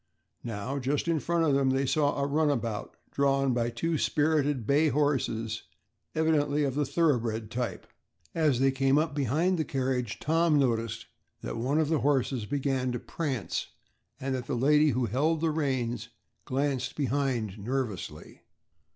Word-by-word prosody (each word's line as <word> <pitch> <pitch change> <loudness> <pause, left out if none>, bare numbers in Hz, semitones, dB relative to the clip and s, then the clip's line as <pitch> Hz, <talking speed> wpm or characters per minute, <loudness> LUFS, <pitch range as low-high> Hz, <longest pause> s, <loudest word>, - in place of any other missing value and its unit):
Now 115 +5 -3
just 140 +5 -1
in 165 -2 +2
front 170 +2 +1
of 145 - +3
them 135 -1 +3
they 135 +1 +1
saw 145 +2 +1
a 140 - +1
runabout, 140 -7 -1
drawn 135 -1 +2
by 120 -1 0
two 155 +7 -1
spirited 145 -5 +1
bay 145 +5 +3
horses 120 -6 0 0.5
evidently 150 -2 +2
of 135 -2 0
the 145 0 0
thoroughbred 120 -8 0
type. 120 -1 -3 0.5
As 150 -6 +2
they 135 0 +4
came 135 +1 +2
up 155 0 +1
behind 155 +7 +1
the - - +2
carriage, 130 -5 -2
Tom 165 0 +2
noticed 115 -4 0 0.4
that - - -4
one 135 +6 +1
of 155 -2 +1
the 160 -2 +2
horses 135 -5 +1
began 135 -2 0
to 120 - -2
prance 135 -10 -3 0.5
and 135 0 -2
that 125 -1 -4
the 140 - -1
lady 150 +4 +4
who 125 -1 +1
held 145 +9 +1
the 165 0 +1
reins 125 -6 -1 0.4
glanced 135 0 -1
behind 130 -7 -1
nervously. 120 -2 -4
135 Hz, 155 wpm, -29 LUFS, 125-150 Hz, 0.5 s, they